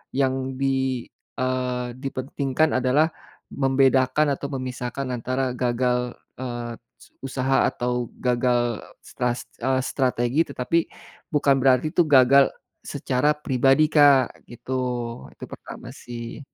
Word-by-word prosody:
yang 130 Hz, -1 st, 0 dB
di, 130 Hz, -2 st, 0 dB, 0.4 s
eee, 125 Hz, -1 st, -1 dB
dipentingkan 135 Hz, +2 st, -1 dB
adalah 135 Hz, +5 st, +3 dB, 0.4 s
membedakan 135 Hz, +1 st, +3 dB
atau 140 Hz, -, -4 dB
memisahkan 130 Hz, 0 st, -4 dB
antara 130 Hz, +2 st, -1 dB
gagal 125 Hz, 0 st, 0 dB, 0.2 s
eee, 120 Hz, -2 st, -5 dB, 0.2 s
su -, -, -19 dB
usaha 135 Hz, 0 st, +1 dB
atau 125 Hz, 0 st, -2 dB
gagal 120 Hz, -2 st, +1 dB, 0.2 s
stras 125 Hz, 0 st, -2 dB, 0.2 s
eee, 130 Hz, +2 st, +1 dB
strategi 130 Hz, +1 st, +1 dB
tetapi 140 Hz, +5 st, 0 dB, 0.5 s
bukan 145 Hz, -2 st, +4 dB
berarti 130 Hz, +3 st, +3 dB
itu 175 Hz, -, +4 dB
gagal 135 Hz, -1 st, +6 dB, 0.4 s
secara 145 Hz, +4 st, 0 dB
pribadi, 135 Hz, +1 st, +3 dB
Kak, 145 Hz, -4 st, +4 dB
gitu. 120 Hz, +2 st, -6 dB, 0.6 s
Itu -, -, -12 dB
pertama -, -, -9 dB
sih. 120 Hz, +1 st, -8 dB
130 Hz, 110 wpm, -24 LUFS, 125-135 Hz, 0.6 s, gagal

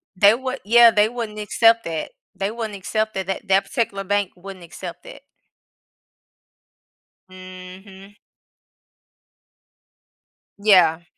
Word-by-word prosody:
They 200 Hz, +3 st, +5 dB
would 260 Hz, +1 st, -5 dB
yeah, 235 Hz, +2 st, +6 dB
they 210 Hz, +1 st, +2 dB
wouldn't 225 Hz, -3 st, -6 dB
accept 230 Hz, +2 st, +2 dB
that. 165 Hz, -1 st, -5 dB, 0.2 s
They 195 Hz, +1 st, -3 dB
wouldn't 225 Hz, -2 st, -6 dB
accept 215 Hz, +3 st, -3 dB
that, 190 Hz, -1 st, -4 dB
that 195 Hz, +2 st, -5 dB
that 195 Hz, +1 st, +2 dB
particular 200 Hz, -4 st, -3 dB
bank 200 Hz, -1 st, -1 dB
wouldn't 185 Hz, -1 st, -11 dB
accept 175 Hz, +1 st, -10 dB
that. -, -, -13 dB, 2.1 s
Mhm. 185 Hz, +2 st, -13 dB, 2.4 s
Yeah. 180 Hz, -5 st, +4 dB
200 Hz, 105 wpm, -21 LUFS, 185-220 Hz, 2.4 s, yeah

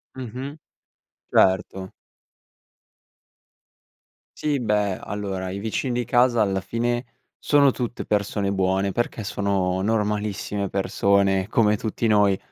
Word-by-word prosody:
Mh-mh, 130 Hz, +3 st, -6 dB, 0.7 s
certo. 95 Hz, 0 st, +2 dB, 2.5 s
Sì 145 Hz, -3 st, 0 dB
beh 105 Hz, -4 st, 0 dB
allora, 95 Hz, -2 st, -4 dB
i 100 Hz, +1 st, -5 dB
vicini 115 Hz, +4 st, -2 dB
di -, -, -2 dB
casa 120 Hz, 0 st, +3 dB
alla 95 Hz, -2 st, +1 dB
fine, 120 Hz, +5 st, -2 dB, 0.3 s
sono 140 Hz, -2 st, +4 dB
tutte 120 Hz, -1 st, -4 dB
persone 100 Hz, -1 st, 0 dB
buone 95 Hz, 0 st, +1 dB
perché 120 Hz, 0 st, -2 dB
sono 95 Hz, -2 st, -1 dB
normalissime 105 Hz, -1 st, -1 dB
persone 95 Hz, 0 st, +1 dB
come 105 Hz, -2 st, +2 dB
tutti 110 Hz, +2 st, -3 dB
noi, 105 Hz, -3 st, +4 dB
105 Hz, 105 wpm, -23 LUFS, 95-120 Hz, 2.5 s, sono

